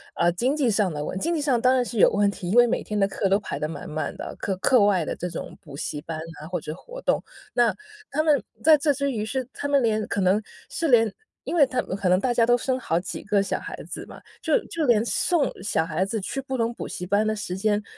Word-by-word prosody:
呃， 175 0 +3
经 250 - 0
济 275 -5 +2
上 200 -3 +2
的 150 -1 -4
问 185 - -4
经 335 - 0
济 - - 0
上 260 -5 +2
当 255 +1 +5
然 250 - +3
是 230 -3 -4
有 - - +7
问 205 0 +3
题， 180 -3 -6
因 215 - +1
为 240 0 +8
每 235 - 0
天 210 -1 -3
的 195 - +4
课 195 0 -1
都 195 +2 +4
排 205 - -5
得 150 - -1
满 165 - -7
满 155 -1 -3
的 - - -6
啊， - - -6
课 195 - -1
课 240 +2 +4
外 190 -6 +3
的 - - -3
这 180 - -4
种 165 - -7
补 150 -7 -11
习 145 0 -4
班 165 0 -5 0.2
啊 155 - -8
或 180 0 -2
者 155 - -6
活 - - -10
动。 - - +1 0.3
那 240 -1 +3 0.3
他 310 +3 0
们 295 -4 +3 0.2
在 315 0 +8
这 290 +1 +3
之 280 0 -1
余 220 -4 -2
是 260 +2 -3
他 285 - -4
们 280 -1 +3
连 215 -1 +1
可 200 - -1
能 190 +3 +3 0.3
是 335 -10 -1
连 225 -5 +4 0.3
因 - - -4
为 290 -5 +6
他 255 - 0
们 - - -6
可 195 -2 -1
能 180 - +5
大 250 -2 +1
家 230 -1 +4
都 245 +1 +4
生 260 +1 -1
好 165 - 0
几 185 - -6
个 205 -1 +2
小 - - -2
孩 - - -7
子 - - -6
嘛。 - - -11 0.2
就 - - +3
就 325 -2 -2
连 230 -4 +4
送 310 +3 +1
小 185 -4 0
孩 165 +2 -1
子 220 +2 -2
去 270 +8 -3
各 265 -1 -3
种 230 0 0
补 - - -6
习 180 - -5
班 205 +3 +2
的 215 - +1
时 190 -3 -4
间 210 +1 +1
215 Hz, 300 characters per minute, -25 LUFS, 190-260 Hz, 0.3 s, 为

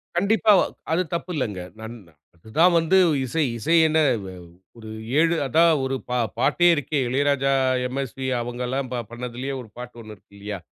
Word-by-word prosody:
கண்டிப்பா. 210 +3 +3 0.4
அது 170 +3 +2
தப்பு 170 +1 -3
இல்லங்க. 105 -9 -3 0.2
நன் 110 +2 -8 0.4
அது 85 +6 -18
தான் 175 +1 +6
வந்து 165 +4 +2 0.3
இசை. 155 +5 -1 0.2
இசை 165 +9 +1
என்ன? 155 +1 +2 0.3
வ - - -7 0.5
ஒரு 110 -1 -10 0.3
7 165 +1 +3
அதான் 165 +3 +4
ஒரு 130 0 -1
பா 125 - 0 0.2
பாட்டே 150 +7 +3
இருக்கே. 145 +1 -2
இளையராஜா, 135 +1 +1 0.3
எம்எஸ்வி 135 0 -4
அவங்கல்லாம் 125 +2 -4 0.2
பண்ணதுலயே 125 +3 -5
ஒரு 110 - -13
பாட்டு 125 0 -9
1 110 -1 -10
இருக்கு 100 +1 -28
இல்லையா? 100 -1 -6
135 Hz, 155 wpm, -23 LUFS, 120-160 Hz, 0.5 s, தான்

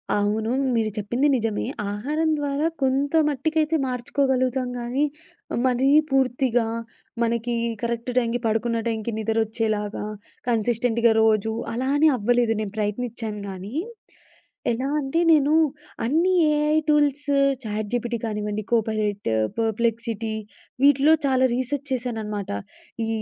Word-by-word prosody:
అవును, 210 +2 0 0.2
మీరు 225 -2 +1
చెప్పింది 240 +7 +1
నిజమే. 225 -3 -1 0.3
ఆహారం 295 +10 -1
ద్వారా 285 +1 -1 0.2
కొంత 270 +2 +1 0.2
మట్టికైతే 310 +3 0
మార్చుకోగలుగుతాం. 255 0 0
కానీ 245 +5 0 0.6
మరీ 260 +1 +2 0.2
పూర్తిగా 255 -3 +2 0.6
మనకి 235 +1 0 0.3
కరెక్ట్ 235 +1 -2
టైంకి 240 -1 +1
పడుకున్న 225 +1 0
టైంకి 225 0 -2
నిదరోచ్చేలాగా 220 -1 -1 0.4
కన్సిస్టెంట్‌గా 235 0 +2
రోజు 220 0 +2 0.2
అలా 255 +3 -1
అని 310 +2 +5
అవ్వలేదు. 240 +1 +2
నేను 210 -2 -4
ప్రయత్నించాను 215 0 -3
కానీ, 195 +5 -7 1.0
ఎలా 250 +3 -1
అంటే 280 +3 -1
నేను 300 -1 +4 0.5
అన్ని 325 +9 +2 0.2
ఏఐ 300 +1 +2
టూల్స్, 290 -1 +2 0.3
చాట్ 215 -1 -3
జీపీటీ 240 0 -1
కానివ్వండి, 210 -1 -3
కోపైలట్, 215 - 0 0.3
పర్ప్లెక్సిటీ 225 0 -1 0.5
వీటిలో 285 +2 +6
చాలా 260 -1 +3
రీసెర్చ్ 260 +3 -2
చేశానన్నమాట. 220 -5 -3 0.5
ఈ - - -4
235 Hz, 110 wpm, -24 LUFS, 220-265 Hz, 1.0 s, వీటిలో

